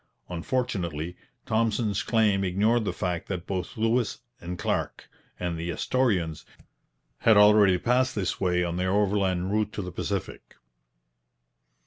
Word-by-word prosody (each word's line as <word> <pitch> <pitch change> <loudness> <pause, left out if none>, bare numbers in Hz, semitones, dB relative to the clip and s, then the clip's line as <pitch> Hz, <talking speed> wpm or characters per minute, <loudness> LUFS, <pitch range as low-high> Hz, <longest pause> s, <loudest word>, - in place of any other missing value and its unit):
Unfortunately, 90 - -2 0.3
Thompson's 110 -2 0
claim 105 -4 +2
ignored 105 +5 +2
the - - 0
fact 90 -3 -3
that 90 -2 -4
both 95 0 -4
Lewis 115 +1 +1 0.2
and 90 +1 -6
Clark - - -2 0.3
and 85 -2 -3
the 85 +1 -4
Astorians 90 - 0 0.8
had 110 -2 +5
already 105 -2 +6
passed 125 +5 +1
this 95 -4 -2
way 90 -1 +2
on 85 0 -2
their 90 +1 0
overland 95 -2 +1
route 105 0 0
to 105 - -4
the 90 - -6
Pacific. - - -5
95 Hz, 130 wpm, -26 LUFS, 90-110 Hz, 0.8 s, already